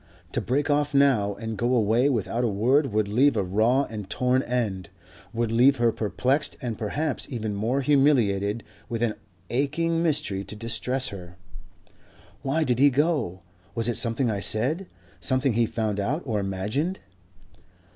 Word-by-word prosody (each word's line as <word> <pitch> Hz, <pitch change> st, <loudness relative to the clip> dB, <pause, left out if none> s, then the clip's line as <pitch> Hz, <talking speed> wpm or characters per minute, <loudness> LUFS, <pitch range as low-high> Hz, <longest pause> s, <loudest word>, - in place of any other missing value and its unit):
To -, -, -1 dB
break 140 Hz, +4 st, 0 dB
off 145 Hz, 0 st, +1 dB
now 120 Hz, -8 st, +3 dB
and 110 Hz, 0 st, -6 dB
go 120 Hz, +2 st, +1 dB
away 115 Hz, +4 st, +3 dB
without 120 Hz, -1 st, -1 dB
a -, -, +2 dB
word 125 Hz, +7 st, +2 dB
would 105 Hz, 0 st, +1 dB
leave 130 Hz, +8 st, +3 dB
a -, -, +1 dB
raw 110 Hz, +9 st, +2 dB
and 105 Hz, -6 st, -7 dB
torn 125 Hz, +1 st, +1 dB
end, 105 Hz, -9 st, -2 dB, 0.4 s
would 115 Hz, -1 st, -1 dB
leave 125 Hz, +4 st, +5 dB
her 120 Hz, -2 st, +2 dB
perplexed 130 Hz, +7 st, -1 dB
and 120 Hz, -5 st, -4 dB
perhaps 135 Hz, +8 st, -2 dB
even 110 Hz, -4 st, -3 dB
more 115 Hz, +7 st, 0 dB
humiliated 120 Hz, -7 st, +2 dB, 0.3 s
with 115 Hz, 0 st, -2 dB
an 115 Hz, -2 st, +1 dB, 0.4 s
aching 165 Hz, +6 st, 0 dB
mystery 150 Hz, -, 0 dB
to 105 Hz, -, -7 dB
distress 120 Hz, +4 st, 0 dB
her. 90 Hz, -3 st, -10 dB, 1.0 s
"Why 145 Hz, +4 st, 0 dB
did 125 Hz, -4 st, 0 dB
he 145 Hz, +1 st, +7 dB
go? 140 Hz, -, 0 dB, 0.3 s
Was 115 Hz, -1 st, +1 dB
it 120 Hz, -, 0 dB
something 115 Hz, +1 st, 0 dB
I 100 Hz, -, -2 dB
said? 130 Hz, -, +1 dB, 0.3 s
something 130 Hz, +7 st, +1 dB
he 115 Hz, +1 st, +2 dB
found 105 Hz, -3 st, -2 dB
out 135 Hz, -, -1 dB
or 110 Hz, -5 st, -1 dB
imagined?" 105 Hz, -, -2 dB
120 Hz, 160 wpm, -25 LUFS, 105-140 Hz, 1.0 s, he